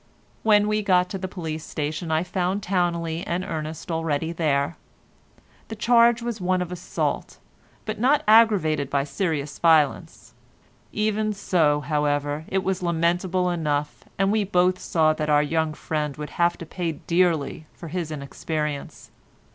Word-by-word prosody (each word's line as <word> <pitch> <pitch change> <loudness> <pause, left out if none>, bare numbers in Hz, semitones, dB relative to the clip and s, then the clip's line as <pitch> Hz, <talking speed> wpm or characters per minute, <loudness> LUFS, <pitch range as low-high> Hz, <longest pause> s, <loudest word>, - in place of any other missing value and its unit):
When 210 -1 +4
we 215 0 +1
got 180 -3 +2
to 195 - -4
the 185 - -3
police 160 -4 -5
station 155 +2 -4
I 160 +1 +2
found 185 +2 -2
Towneley 170 -3 -1
and 180 +2 -2
Ernest 155 +1 -5
already 160 -1 -1
there. 155 -2 0 0.9
The 220 - -6
charge 235 +1 +4
was 235 -4 -4
one 185 0 +1
of 180 -1 -3
assault, 180 -1 -3 0.5
but 215 -1 -4
not 270 +5 +3
aggravated 195 -11 +4
by 140 -1 +1
serious 150 -3 -3
violence. 160 -4 +2 0.6
Even 215 0 0
so, 160 -7 +1
however, 145 0 -1
it 190 0 -1
was 190 -1 -1
lamentable 175 +2 +1
enough, 150 -3 -2
and 195 +1 +2
we 215 -1 +2
both 185 -1 +2
saw 155 -2 +2
that 155 -1 -3
our 150 0 +4
young 160 0 -1
friend 150 -3 -3
would 150 0 -6
have 175 0 +1
to 170 - -8
pay 170 0 -3
dearly 165 -2 0
for 165 - -10
his 170 -1 -3
inexperience. 150 0 -5
170 Hz, 150 wpm, -24 LUFS, 155-185 Hz, 0.9 s, When